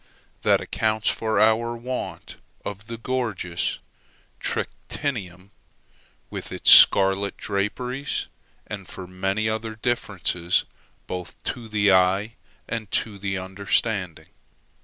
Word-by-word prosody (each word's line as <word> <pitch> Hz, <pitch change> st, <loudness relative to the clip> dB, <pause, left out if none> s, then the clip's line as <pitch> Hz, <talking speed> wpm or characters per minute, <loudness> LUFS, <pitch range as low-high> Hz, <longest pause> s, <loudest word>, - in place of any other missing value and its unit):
That -, -, +4 dB
accounts 110 Hz, -1 st, 0 dB
for 110 Hz, -2 st, 0 dB
our 110 Hz, +2 st, +4 dB
want 125 Hz, +2 st, -5 dB, 0.3 s
of 100 Hz, +1 st, -6 dB
the 115 Hz, 0 st, -5 dB
gorgeous 115 Hz, -8 st, -2 dB, 0.6 s
trictinium, 100 Hz, -, -3 dB, 0.8 s
with -, -, -6 dB
its -, -, +4 dB
scarlet 95 Hz, 0 st, +7 dB
draperies, 125 Hz, +7 st, -2 dB, 0.4 s
and 100 Hz, -4 st, -7 dB
for 95 Hz, -, -8 dB
many 95 Hz, +4 st, -1 dB
other 110 Hz, 0 st, -2 dB
differences 100 Hz, -6 st, 0 dB, 0.4 s
both 90 Hz, -1 st, -6 dB
to 120 Hz, -3 st, -4 dB
the 105 Hz, -2 st, +3 dB
eye 95 Hz, +4 st, +3 dB, 0.3 s
and 110 Hz, -3 st, -4 dB
to 105 Hz, -3 st, -1 dB
the 95 Hz, -1 st, -2 dB
understanding. 95 Hz, -1 st, -1 dB
105 Hz, 105 wpm, -24 LUFS, 95-115 Hz, 0.8 s, scarlet